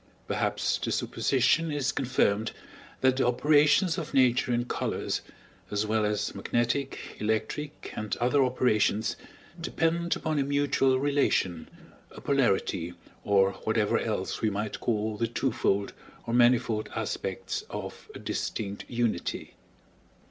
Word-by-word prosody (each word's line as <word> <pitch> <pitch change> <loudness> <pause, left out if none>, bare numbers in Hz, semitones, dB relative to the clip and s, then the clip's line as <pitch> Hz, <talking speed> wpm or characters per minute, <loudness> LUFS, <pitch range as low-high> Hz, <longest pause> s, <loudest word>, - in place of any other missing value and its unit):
Perhaps - - 0
the - - -2
supposition 140 +5 +1
is 145 -3 0
confirmed 115 -4 +1 0.5
that 130 0 +3
the 130 - +2
operations 150 +7 +4
of 155 -3 -6
Nature 130 -1 +4
in 120 0 +1
colors, - - -2 0.5
as 105 +1 0
well 110 0 +1
as 105 -1 -1
magnetic, 120 +6 -1 0.2
electric, 110 +7 -3
and 105 -1 -3
other 125 +3 +3
operations, 115 -4 +1 0.5
depend 170 +1 0
upon 155 -2 -1
a - - +3
mutual 140 -2 +2
relation, 135 - +1 0.4
a - - -12
polarity, 95 -10 +1 0.3
or 100 -1 +4
whatever - - +2
else - - -2
we 110 - +2
might 105 +1 -3
call 110 -2 -1
the 115 - 0
twofold 115 -5 0 0.3
or 115 - -3
manifold 120 -2 +3
aspects - - -3
of - - -7
a - - -5
distinct 100 -1 -4
unity. 120 -2 -2
120 Hz, 125 wpm, -28 LUFS, 105-140 Hz, 0.5 s, operations